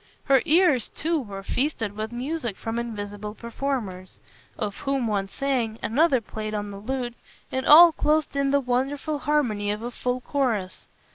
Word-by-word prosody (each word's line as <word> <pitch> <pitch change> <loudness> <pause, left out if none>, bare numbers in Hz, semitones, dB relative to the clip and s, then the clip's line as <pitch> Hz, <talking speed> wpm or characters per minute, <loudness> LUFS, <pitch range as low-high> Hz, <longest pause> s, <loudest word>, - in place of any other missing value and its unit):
Her 270 -2 +4
ears 310 - +4
too 330 +1 -1
were 200 -6 -7
feasted 230 -3 -1
with 215 +1 -4
music 245 -3 -3
from 225 0 -3
invisible 210 -2 -5
performers; 230 -7 -4 0.4
of 210 -3 -3
whom 275 -3 -1
one 200 -3 0
sang, 240 -1 -1
another 275 +2 +3
played 215 0 -5
on 205 -1 -3
the 200 - -8
lute, 245 +2 -3 0.4
and 260 0 -2
all 335 +3 +10
closed 305 -1 +1
in 280 0 +1
the 280 +1 +3
wonderful 275 +4 -1
harmony 245 -9 0
of 210 +2 -2
a 240 - -4
full 250 +1 -2
chorus. 245 -9 -2
245 Hz, 160 wpm, -25 LUFS, 210-280 Hz, 0.4 s, all